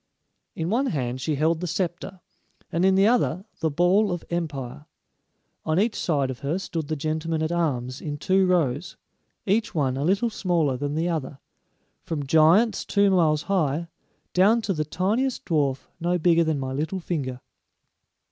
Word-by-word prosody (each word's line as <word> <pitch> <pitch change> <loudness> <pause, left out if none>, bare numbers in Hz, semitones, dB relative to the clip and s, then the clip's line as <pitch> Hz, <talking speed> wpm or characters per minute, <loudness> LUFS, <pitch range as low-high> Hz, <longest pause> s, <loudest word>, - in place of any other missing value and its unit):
In 165 +3 -2
one 260 +5 +1
hand 130 - -2
she 150 +3 -1
held 160 +3 +1
the 180 - -3
scepter, 180 +2 -3 0.5
and 170 +2 0
in 190 0 +4
the 195 +1 +5
other 210 -6 +1
the 160 - +1
ball 180 +7 +3
of 175 -2 -4
empire. 150 -4 -4 0.8
On 155 +2 +1
each 220 +2 +2
side 140 -5 0
of 125 - -8
her 145 +5 -1
stood 165 -5 -4
the 155 - -2
gentlemen 155 +2 -2
at 155 - -1
arms 135 -7 -1
in 145 -1 -4
two 190 +5 +2
rows, 160 -4 0 0.5
each 215 +2 0
one 135 -4 0
a 140 - -1
little 200 +8 +1
smaller 170 -10 0
than 145 +3 -3
the 165 +2 0
other, 150 -5 -3 0.6
from 150 -4 -4
giants 160 - +4
two 200 -1 +2
miles 155 -5 +3
high, 170 -4 0 0.4
down 205 +6 +4
to 195 - 0
the 155 -3 -1
tiniest 215 - -1
dwarf 140 -5 0
no 175 +2 +1
bigger 170 0 +3
than 160 -2 0
my 130 -1 -3
little 160 +7 -2
finger. 140 -8 -3
165 Hz, 170 wpm, -25 LUFS, 145-185 Hz, 0.8 s, the